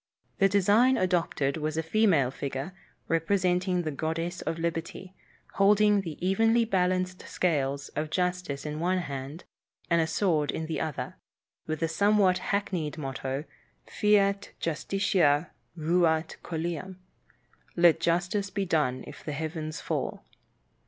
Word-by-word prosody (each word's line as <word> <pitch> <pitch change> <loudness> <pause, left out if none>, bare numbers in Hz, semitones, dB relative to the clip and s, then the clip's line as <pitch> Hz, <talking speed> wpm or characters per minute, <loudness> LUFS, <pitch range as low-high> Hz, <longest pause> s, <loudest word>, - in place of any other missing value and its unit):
The 195 - +5
design 205 +7 +4
adopted 170 -6 0
was 155 0 -2
a 160 - 0
female 165 - +3
figure, 135 +5 -5 0.3
representing 180 +1 +1
the 155 - -2
goddess 165 +4 -3
of 165 - -3
liberty, 170 +2 -4 0.4
holding 205 +1 +4
the 165 -5 -6
evenly 225 +4 +3
balanced 185 -2 0
scales 140 -5 -1
of 155 +1 -3
justice 180 -5 -2
in 150 0 -4
one 180 +3 +1
hand 140 -1 -5 0.5
and 170 0 +4
a 160 - 0
sword 160 -3 +1
in 160 - -2
the 160 - -3
other, 155 -3 -4 0.5
with 155 0 -3
the 165 - +2
somewhat 200 +2 +3
hackneyed 180 -7 -2
motto, 135 -1 -4 0.4
"Fiat 200 -2 +2
justitia 170 -2 +1 0.3
ruat 160 0 +1
coelum" 170 +2 -4 0.8
("Let 170 -2 +5
justice 180 +4 0
be 200 0 -2
done 140 -7 0
if - - -11
the 150 - -4
heavens 155 +1 -4
fall"). - - -3
170 Hz, 130 wpm, -28 LUFS, 155-190 Hz, 0.8 s, The